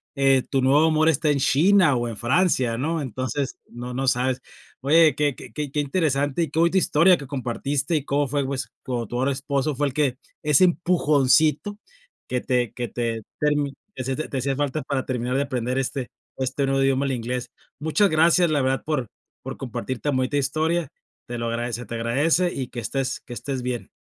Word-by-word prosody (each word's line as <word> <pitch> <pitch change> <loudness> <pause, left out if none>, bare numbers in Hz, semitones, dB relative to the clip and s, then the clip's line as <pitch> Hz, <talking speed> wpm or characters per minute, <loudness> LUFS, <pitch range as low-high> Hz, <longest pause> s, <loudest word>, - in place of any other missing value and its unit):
eh, 135 -2 +3
tu 135 -1 +1
nuevo 140 +4 +4
amor 155 0 +3
está 155 0 +1
en 145 -1 +2
China 170 +3 +4
o 120 -1 -1
en 115 - -5
Francia, 130 - +1
¿no?, 160 +5 -1
entonces, 130 +1 -3
no 120 +1 -7
no 135 +2 -2
sabes. 125 0 +1 0.4
Oye, 155 +1 +5
qué 145 -2 +1
qué - - -11
qué 150 -3 -4
qué 150 - -1
interesante 145 0 0
y 155 - -4
qué 160 - -1
bonita 170 +3 +3
historia 180 0 +4
que 140 - -9
compartiste 140 +3 -2
y 145 -3 -1
cómo 145 0 +1
fue 140 +1 -1
pues 135 -1 -4
con 120 -3 -3
tu 120 - -4
ahora 135 +2 +1
esposo, 140 +2 -1
fue 145 +2 +1
el 135 - -5
que 135 -3 +1 0.3
ese 150 +2 +4
empujoncito 160 +1 +2 0.5
que 125 - 0
te 125 -3 0
que 120 -1 -3
te 115 -1 -3 0.2
termi 145 -2 +1 0.2
te 130 - -4
hacia 130 +1 -2
te 145 -2 -4
hacía 135 +1 -1
falta 145 +2 -1
para 135 -2 -2
terminar 125 0 -2
de - - +2
aprender 125 -2 -2
este 130 -1 -3 0.3
este 135 +1 -1
nuevo 135 0 +1
idioma, 135 0 +2
el 135 - 0
inglés. 125 0 -3 0.3
Muchas 160 +7 +3
gracias, 170 +2 +4
la 145 -3 +2
verdad, 130 0 0
por 150 -6 -1 0.4
por - - -6
compartir 130 -1 -4
tan 145 -2 0
bonita 130 +3 0
historia. 155 +4 0 0.4
Te 120 0 -5
lo 115 0 -2
agradece 120 +1 -3
te 115 - -6
agradece 145 +10 +1
y 130 -2 -3
que 120 - -6
estés 135 +3 -2
que 120 - -10
estés 130 +1 -4
bien. 125 -1 -3
135 Hz, 200 wpm, -24 LUFS, 125-150 Hz, 0.5 s, Oye